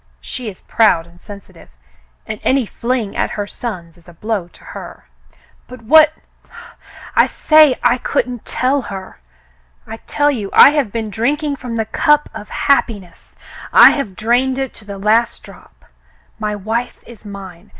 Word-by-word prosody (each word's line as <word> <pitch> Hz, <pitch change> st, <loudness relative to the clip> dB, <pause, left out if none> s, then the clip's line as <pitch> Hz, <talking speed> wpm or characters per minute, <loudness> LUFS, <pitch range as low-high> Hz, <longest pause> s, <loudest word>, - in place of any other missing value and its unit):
She 250 Hz, -4 st, -6 dB
is 190 Hz, -, -13 dB
proud 210 Hz, -7 st, +2 dB
and 170 Hz, +1 st, -21 dB
sensitive, 200 Hz, -4 st, -13 dB, 0.6 s
and 215 Hz, -, -6 dB
any 265 Hz, -2 st, +1 dB
fling 235 Hz, -1 st, -3 dB
at -, -, -1 dB
her 205 Hz, -, -2 dB
sons 180 Hz, -7 st, -8 dB
is 170 Hz, -, -19 dB
a -, -, -14 dB
blow 205 Hz, 0 st, -3 dB
to -, -, -20 dB
her." -, -, -10 dB, 0.6 s
"But 250 Hz, -2 st, -12 dB
what 310 Hz, +5 st, +6 dB, 0.4 s
— 470 Hz, 0 st, -15 dB
" -, -, -16 dB
*'I -, -, +5 dB
say 305 Hz, -4 st, +4 dB
I 250 Hz, -, +3 dB
couldn't 245 Hz, -1 st, -2 dB
tell 265 Hz, +2 st, 0 dB
her. 190 Hz, -1 st, -9 dB, 0.7 s
I 225 Hz, -, -8 dB
tell 290 Hz, 0 st, +1 dB
you 215 Hz, -8 st, -4 dB
I -, -, +8 dB
have 290 Hz, -8 st, -1 dB
been 220 Hz, -1 st, -4 dB
drink 270 Hz, +9 st, -1 dB
ing 290 Hz, -2 st, -1 dB
from 250 Hz, -3 st, -7 dB
the 225 Hz, -1 st, -1 dB
cup 295 Hz, +6 st, +2 dB
of 210 Hz, -, -9 dB
happiness. 205 Hz, -, -1 dB, 0.4 s
I -, -, +8 dB
have 220 Hz, -10 st, -4 dB
drained 245 Hz, +5 st, +1 dB
it 270 Hz, -2 st, -3 dB
to 215 Hz, -, -12 dB
the 200 Hz, -1 st, -8 dB
last 215 Hz, +4 st, +1 dB
drop. -, -, -17 dB, 0.5 s
My 210 Hz, -1 st, -2 dB
wife 225 Hz, +5 st, -4 dB
is 235 Hz, -3 st, -14 dB
mine. 195 Hz, -2 st, -11 dB
225 Hz, 170 wpm, -17 LUFS, 200-260 Hz, 0.7 s, I